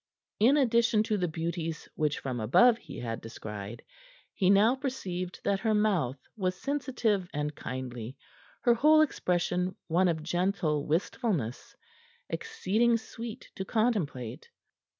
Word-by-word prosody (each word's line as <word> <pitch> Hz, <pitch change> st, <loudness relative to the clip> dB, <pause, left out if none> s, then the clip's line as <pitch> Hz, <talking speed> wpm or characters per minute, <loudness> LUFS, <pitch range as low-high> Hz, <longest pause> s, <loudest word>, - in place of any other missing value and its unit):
In 250 Hz, +8 st, +5 dB
addition 235 Hz, -4 st, +3 dB
to 215 Hz, -1 st, 0 dB
the 180 Hz, -, +1 dB
beauties 165 Hz, 0 st, -3 dB
which 150 Hz, -2 st, 0 dB
from 130 Hz, -3 st, -4 dB
above 225 Hz, -, +5 dB
he -, -, -10 dB
had 115 Hz, -2 st, -4 dB
descried, 110 Hz, 0 st, -7 dB, 0.5 s
he 185 Hz, -, +2 dB
now 205 Hz, +4 st, +6 dB
perceived 190 Hz, -10 st, -4 dB
that 200 Hz, -1 st, +1 dB
her 220 Hz, +1 st, +1 dB
mouth 185 Hz, -, +1 dB, 0.2 s
was 185 Hz, -3 st, -2 dB
sensitive 245 Hz, -9 st, -1 dB
and 150 Hz, 0 st, -1 dB
kindly, 125 Hz, -2 st, -6 dB, 0.5 s
her 240 Hz, -, +6 dB
whole 305 Hz, +6 st, +6 dB
expression 180 Hz, -, 0 dB
one 180 Hz, +3 st, +3 dB
of 160 Hz, -3 st, -1 dB
gentle 170 Hz, -3 st, 0 dB
wistfulness, 160 Hz, -, -1 dB, 0.6 s
exceeding 235 Hz, -, +1 dB
sweet 230 Hz, +1 st, -8 dB
to 190 Hz, -, -4 dB
contemplate. 190 Hz, -, -1 dB
185 Hz, 130 wpm, -29 LUFS, 150-230 Hz, 0.6 s, now